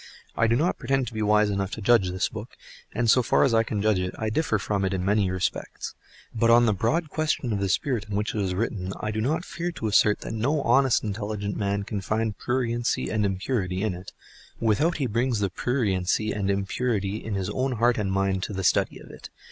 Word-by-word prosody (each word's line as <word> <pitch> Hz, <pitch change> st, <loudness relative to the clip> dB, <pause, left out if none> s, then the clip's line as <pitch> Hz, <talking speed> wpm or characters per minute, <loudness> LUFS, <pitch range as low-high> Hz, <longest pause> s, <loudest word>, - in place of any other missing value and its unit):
I 115 Hz, -, +3 dB
do 115 Hz, -, +3 dB
not 160 Hz, +8 st, +1 dB
pretend 135 Hz, -1 st, 0 dB
to 115 Hz, -, -7 dB
be 110 Hz, -, -3 dB
wise 105 Hz, 0 st, +3 dB
enough 100 Hz, -1 st, -1 dB
to -, -, -5 dB
judge 105 Hz, -3 st, +4 dB
this 95 Hz, +1 st, 0 dB
book, 110 Hz, +2 st, -9 dB, 0.3 s
and 120 Hz, 0 st, -1 dB
so 125 Hz, +3 st, +5 dB
far 120 Hz, -, +3 dB
as 135 Hz, -, +3 dB
I 115 Hz, -, +5 dB
can 105 Hz, -3 st, -2 dB
judge 110 Hz, -3 st, +3 dB
it, 90 Hz, 0 st, -3 dB
I 110 Hz, -1 st, -2 dB
differ 115 Hz, -3 st, +1 dB
from 100 Hz, 0 st, -1 dB
it 95 Hz, 0 st, 0 dB
in 90 Hz, -1 st, -2 dB
many 100 Hz, -1 st, +2 dB
respects; 95 Hz, 0 st, -3 dB, 0.4 s
but 115 Hz, 0 st, +2 dB
on 120 Hz, +1 st, +6 dB
the 110 Hz, -, +3 dB
broad 150 Hz, -, 0 dB
question 155 Hz, -7 st, -1 dB
of 100 Hz, -, -1 dB
the 100 Hz, -1 st, -1 dB
spirit 120 Hz, +1 st, 0 dB
in 100 Hz, -, -3 dB
which 105 Hz, +2 st, -1 dB
it 105 Hz, -, -1 dB
is 95 Hz, -2 st, -1 dB
written, 95 Hz, -2 st, -2 dB
I 110 Hz, -, -2 dB
do 110 Hz, 0 st, -2 dB
not 155 Hz, +9 st, 0 dB
fear 175 Hz, +1 st, -4 dB
to 115 Hz, -, -6 dB
assert 105 Hz, 0 st, +3 dB
that -, -, -5 dB
no 135 Hz, +7 st, 0 dB
honest 135 Hz, -2 st, +3 dB
and 105 Hz, -, -2 dB
intelligent 105 Hz, -1 st, -4 dB
man 100 Hz, 0 st, -1 dB
can 100 Hz, 0 st, -4 dB
find 110 Hz, +2 st, -1 dB
pruriency 120 Hz, -1 st, -1 dB
and 110 Hz, -1 st, +1 dB
impurity 95 Hz, -1 st, -1 dB
in 110 Hz, -3 st, 0 dB
it, 90 Hz, +2 st, -9 dB, 0.5 s
without 145 Hz, +10 st, +2 dB
he 140 Hz, -, -1 dB
brings 120 Hz, +1 st, 0 dB
the 100 Hz, -3 st, 0 dB
pruriency 105 Hz, -3 st, 0 dB
and 100 Hz, -2 st, -1 dB
impurity 100 Hz, +1 st, -1 dB
in 110 Hz, -2 st, -3 dB
his 95 Hz, 0 st, -2 dB
own 130 Hz, +3 st, -1 dB
heart 120 Hz, 0 st, +2 dB
and 100 Hz, -2 st, -1 dB
mind 95 Hz, -1 st, 0 dB
to 100 Hz, -, -4 dB
the 95 Hz, 0 st, -3 dB
study -, -, +2 dB
of -, -, -13 dB
it. -, -, -11 dB
110 Hz, 235 wpm, -26 LUFS, 100-120 Hz, 0.5 s, on